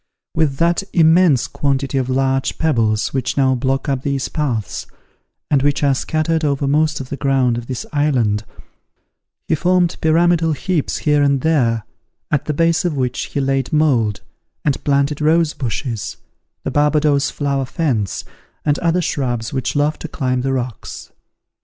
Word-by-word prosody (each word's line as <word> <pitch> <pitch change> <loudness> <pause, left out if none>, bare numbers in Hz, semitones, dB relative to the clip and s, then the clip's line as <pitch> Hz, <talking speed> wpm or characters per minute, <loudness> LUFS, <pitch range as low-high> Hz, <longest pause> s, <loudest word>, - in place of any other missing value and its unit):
With 155 -4 +1
that 170 +3 +2
immense 165 -4 +4
quantity 140 -1 -1
of 130 -1 -2
large 135 0 0
pebbles 115 -9 +1
which 130 0 -2
now 135 -1 +3
block 130 +1 -1
up 135 -2 0
these 140 -1 -2
paths, 125 -9 -2 0.6
and 140 -2 +4
which 145 +1 +1
are 140 -1 +4
scattered 160 +4 -1
over 140 -1 0
most 155 +2 +2
of 130 -2 -7
the 140 - -4
ground 135 -4 +2
of 120 0 -6
this 130 -2 -4
island, 125 -8 +1 1.0
he - - +1
formed 175 +2 +2
pyramidal 165 0 +3
heaps 165 0 -1
here 150 -1 +2
and 140 -2 +2
there, 120 -8 +1 0.5
at 150 -2 +1
the 150 - -1
base 165 +1 +2
of 170 -5 -1
which 125 -1 -1
he - - -4
laid 135 -1 0
mould, 125 -10 +2 0.4
and 140 -3 0
planted 140 +1 +1
rose 160 +1 +3
bushes, 115 -3 -4 0.5
the - - -2
Barbadoes 150 -1 +2
flower 140 -2 -1
fence, 125 - -1 0.4
and 145 0 +2
other 175 +1 +1
shrubs 120 -6 -2
which 130 +2 -2
love 145 +2 +1
to - - -5
climb 130 -4 -1
the 135 +1 -1
rocks. 125 -3 -5
140 Hz, 160 wpm, -19 LUFS, 130-155 Hz, 1.0 s, immense